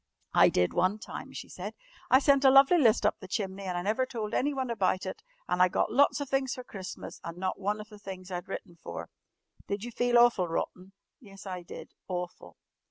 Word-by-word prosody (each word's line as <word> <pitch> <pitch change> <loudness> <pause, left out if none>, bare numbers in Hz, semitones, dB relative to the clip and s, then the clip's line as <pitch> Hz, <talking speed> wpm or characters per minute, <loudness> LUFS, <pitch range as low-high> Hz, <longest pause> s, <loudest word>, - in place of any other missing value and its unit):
"I - - +7
did 90 0 +1
one 185 +3 +2
time," 215 - -8
she - - -7
said. - - -7 0.3
"I 260 - +8
sent 280 0 +4
a 270 - +8
lovely 275 +6 +7
list 225 -6 +4
up 210 - +2
the 190 - -10
chimney 195 0 -3
and 180 -1 -2
I 175 - -2
never 220 +6 +1
told 220 -3 -4
anyone 265 -3 0
about 190 -4 0
it 440 - -5 0.3
and 180 - +1
I 180 - +7
got 180 - 0
lots 280 +6 +4
of 285 - -3
things 270 0 0
for 255 - -7
Christmas 190 -5 -8
and 170 +1 -7
not 185 +1 -2
one 205 +2 -1
of 215 +1 -9
the 210 -1 -13
things 190 -2 -8
I'd 175 -1 -4
written 175 -2 -7
for!" 170 - -8 0.6
"Did 200 +1 -3
you 240 - -5
feel 245 +1 +2
awful 235 -7 +5
rotten?" 180 +3 -4 0.3
"Yes, 195 -6 -13
I 185 -2 -5
did. 170 - -10 0.2
Awful." 180 -1 -6
205 Hz, 220 wpm, -29 LUFS, 185-250 Hz, 0.6 s, I